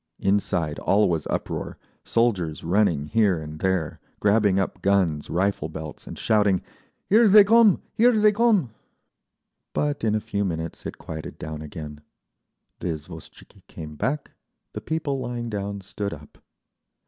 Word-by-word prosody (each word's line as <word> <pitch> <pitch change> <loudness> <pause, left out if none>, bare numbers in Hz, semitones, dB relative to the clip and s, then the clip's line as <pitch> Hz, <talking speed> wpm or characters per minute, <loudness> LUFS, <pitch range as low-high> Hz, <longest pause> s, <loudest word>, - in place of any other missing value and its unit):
Inside 95 -6 0
all 105 +2 +3
was 80 -4 -1
uproar, - - -3 0.3
soldiers 100 -10 0
running 85 -5 +2
here 100 0 +2
and 75 0 -8
there, 95 -4 -1 0.2
grabbing 105 -2 +3
up 95 - -2
guns, 90 -7 +1
rifle 90 -3 0
belts 80 -1 -8
and - - -8
shouting, 105 -4 +2 0.4
"Here 220 +3 +5
they 210 +1 +9
come! 220 -1 +5
Here 235 +2 +5
they 210 0 +5
come!"… 210 - +2 1.0
But 145 -3 -1
in 110 -1 +2
a - - +2
few 105 -1 -2
minutes 80 -3 -4
it - - -7
quieted 80 -1 -8
down 75 -1 -6
again. 75 -1 -8 0.8
The - - -4
izvoshtchiki 80 0 -8
came 75 -1 -9
back, 140 - -2 0.4
the - - -5
people 150 -3 -2
lying 120 -2 -4
down 100 -1 -4
stood 100 +1 -5
up. 75 -1 -17
100 Hz, 145 wpm, -24 LUFS, 80-120 Hz, 1.0 s, they